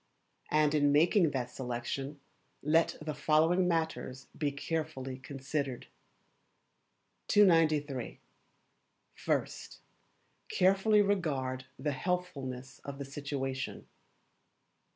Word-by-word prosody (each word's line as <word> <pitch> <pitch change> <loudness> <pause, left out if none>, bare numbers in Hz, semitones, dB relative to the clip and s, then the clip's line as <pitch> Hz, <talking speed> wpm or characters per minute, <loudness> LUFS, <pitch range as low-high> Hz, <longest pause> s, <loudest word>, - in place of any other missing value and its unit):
And 150 -1 +3
in 145 -1 +4
making 165 +4 +4
that 125 -3 -3
selection 130 +3 -4 0.4
let 160 +3 +3
the 155 0 -4
following 160 +5 +3
matters 160 -6 -2
be 145 -2 0
carefully 140 -3 -4
considered: 135 -1 -4 1.4
293. 155 - +3 0.9
First - - -3 0.7
Carefully 195 +3 +4
regard 140 -10 -1
the 150 - -1
Healthfulness 135 -5 -3
of 140 -1 -6
the 140 - -5
Situation. 135 -1 -4
145 Hz, 85 wpm, -32 LUFS, 135-165 Hz, 1.4 s, in